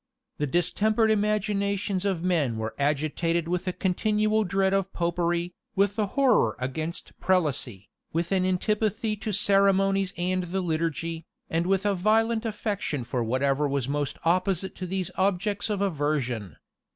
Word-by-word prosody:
The 150 Hz, -, 0 dB
distempered 215 Hz, -, +2 dB
imaginations 200 Hz, -2 st, 0 dB
of 185 Hz, -4 st, 0 dB
men 155 Hz, -11 st, +1 dB
were 110 Hz, 0 st, -3 dB
agitated 155 Hz, +4 st, 0 dB
with 180 Hz, +1 st, -2 dB
a -, -, +2 dB
continual 215 Hz, +4 st, +1 dB
dread 195 Hz, 0 st, +1 dB
of 195 Hz, -1 st, 0 dB
Popery, 175 Hz, 0 st, -1 dB, 0.2 s
with 200 Hz, +2 st, +1 dB
a 210 Hz, -, +2 dB
horror 245 Hz, -, +4 dB
against 155 Hz, +6 st, -4 dB
prelacy, 140 Hz, -, 0 dB, 0.2 s
with 170 Hz, +2 st, -1 dB
an 190 Hz, -1 st, +2 dB
antipathy 210 Hz, +3 st, 0 dB
to 210 Hz, +1 st, -4 dB
ceremonies 195 Hz, -1 st, +3 dB
and 180 Hz, +1 st, 0 dB
the 190 Hz, +2 st, -2 dB
liturgy, 165 Hz, -1 st, -2 dB, 0.2 s
and 165 Hz, +2 st, 0 dB
with 195 Hz, +1 st, +1 dB
a 205 Hz, -, +3 dB
violent 220 Hz, +4 st, +2 dB
affection 205 Hz, -, -2 dB
for 120 Hz, 0 st, -2 dB
whatever 135 Hz, +5 st, +1 dB
was 140 Hz, -3 st, -1 dB
most 145 Hz, 0 st, -2 dB
opposite 185 Hz, +2 st, +1 dB
to 185 Hz, -, -4 dB
these 185 Hz, -1 st, -2 dB
objects 200 Hz, +3 st, 0 dB
of 205 Hz, -2 st, -1 dB
aversion. 145 Hz, -, -1 dB
185 Hz, 145 wpm, -26 LUFS, 155-200 Hz, 0.2 s, horror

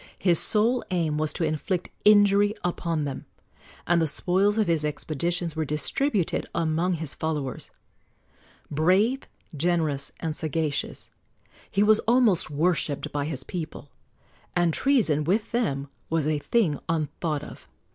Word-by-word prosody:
His 175 Hz, -3 st, +3 dB
sole 230 Hz, +4 st, +2 dB
aim 160 Hz, -4 st, 0 dB
was 155 Hz, -1 st, 0 dB
to -, -, -2 dB
inflict 160 Hz, +4 st, -2 dB
injury 205 Hz, 0 st, +5 dB
upon 170 Hz, -3 st, -1 dB
them, 135 Hz, -2 st, -6 dB, 0.6 s
and 170 Hz, -1 st, +3 dB
the 160 Hz, -, +2 dB
spoils 190 Hz, +7 st, +1 dB
of 215 Hz, -, +3 dB
his 165 Hz, -4 st, +1 dB
expeditions 165 Hz, +3 st, -2 dB
were 160 Hz, -, 0 dB
distributed 175 Hz, -, 0 dB
among 165 Hz, +3 st, +1 dB
his 160 Hz, -3 st, -3 dB
followers. 150 Hz, -4 st, -3 dB, 1.0 s
Brave, 190 Hz, -, +2 dB, 0.3 s
generous 155 Hz, -3 st, 0 dB
and 160 Hz, -2 st, -3 dB
sagacious, 155 Hz, -2 st, -3 dB, 0.6 s
he 200 Hz, -, +2 dB
was 215 Hz, +1 st, +5 dB
almost 230 Hz, -9 st, +4 dB
worshipped 155 Hz, -1 st, 0 dB
by 145 Hz, -1 st, -2 dB
his 140 Hz, -4 st, -3 dB
people, 155 Hz, -4 st, -7 dB, 0.6 s
and 175 Hz, -2 st, +2 dB
treason, 215 Hz, -, +2 dB
with 200 Hz, +8 st, 0 dB
them, 145 Hz, -, -1 dB, 0.2 s
was 160 Hz, -2 st, 0 dB
a 155 Hz, -1 st, +1 dB
thing 165 Hz, -2 st, +1 dB
unthought 155 Hz, -1 st, -2 dB
of. -, -, -11 dB
165 Hz, 135 wpm, -26 LUFS, 150-195 Hz, 1.0 s, injury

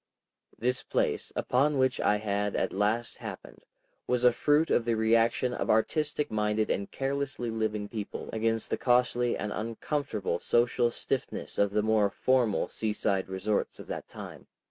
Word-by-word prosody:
This 125 Hz, +2 st, 0 dB
place, -, -, -1 dB
upon 140 Hz, +3 st, +2 dB
which 130 Hz, 0 st, +2 dB
I 105 Hz, -, +3 dB
had 105 Hz, -1 st, -1 dB
at -, -, 0 dB
last 110 Hz, +4 st, 0 dB
happened, -, -, -9 dB, 0.4 s
was 125 Hz, 0 st, +1 dB
a 125 Hz, -, +7 dB
fruit 150 Hz, +6 st, +2 dB
of 120 Hz, -, +3 dB
the 115 Hz, 0 st, +1 dB
reaction 115 Hz, +3 st, +2 dB
of -, -, -3 dB
artistic 150 Hz, +6 st, +1 dB
minded 105 Hz, 0 st, +1 dB
and 100 Hz, -, -2 dB
carelessly 135 Hz, -3 st, -2 dB
living 110 Hz, -2 st, -2 dB
people 105 Hz, -1 st, -6 dB
against 115 Hz, 0 st, 0 dB
the -, -, +1 dB
costly 125 Hz, -1 st, +2 dB
and 105 Hz, -, -3 dB
uncomfortable 110 Hz, -, -2 dB
social 120 Hz, 0 st, +2 dB
stiffness 120 Hz, -, -4 dB
of 100 Hz, -, +4 dB
the 105 Hz, +1 st, 0 dB
more 110 Hz, -2 st, +3 dB
formal 125 Hz, -2 st, +1 dB
seaside 105 Hz, -3 st, -1 dB
resorts 95 Hz, +3 st, -1 dB
of -, -, -8 dB
that -, -, -7 dB
time. -, -, -10 dB
115 Hz, 155 wpm, -29 LUFS, 105-125 Hz, 0.4 s, a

